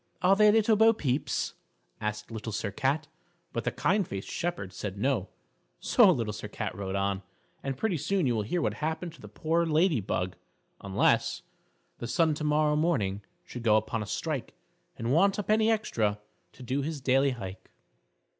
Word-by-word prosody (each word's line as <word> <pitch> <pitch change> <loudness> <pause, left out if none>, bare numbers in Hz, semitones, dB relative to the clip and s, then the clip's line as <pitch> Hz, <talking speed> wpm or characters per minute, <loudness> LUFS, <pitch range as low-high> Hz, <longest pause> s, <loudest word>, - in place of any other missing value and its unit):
"Are 190 +2 +6
they 210 +1 +6
little 220 0 +4
Bo 225 +2 +6
Peep's?" 140 - -1 0.5
asked 105 +1 -4
Little 110 0 -5
Sir 105 -1 -2
Cat; 140 +8 0 0.5
but - - -3
the - - +1
kind 195 0 +1
faced 95 0 -6
shepherd 170 - -3
said 100 +1 -5
no, 120 -3 0 0.5
so - - +5
Little 110 -3 -1
Sir 105 - -6
Cat 105 -1 -4
rode 95 0 -4
on, 100 0 0 0.4
and 135 -1 -3
pretty 205 -2 0
soon 190 +3 0
you 125 - +2
will 110 - 0
hear 160 +11 -1
what - - +1
happened 160 +2 -3
to 150 - -16
the 105 - -9
poor 160 +10 0
Lady 160 - +2
Bug, 90 -1 -2 0.5
unless 100 -1 +2 0.6
_The 120 - -5
Sun 160 +5 +3
tomorrow 150 0 +2
morning 105 - +1 0.2
Should 125 - -7
go 110 -2 +4
upon 110 +1 -1
a 105 - -5
strike, 150 +4 -3 0.4
And 115 +3 -1
want 195 +5 +4
a 210 - -1
penny 215 +2 +3
extra 110 - 0 0.3
To 130 - -12
do 130 +3 -1
his 155 +1 -3
daily 135 +1 +3
hike! 95 -3 -8
135 Hz, 180 wpm, -29 LUFS, 105-170 Hz, 0.6 s, Are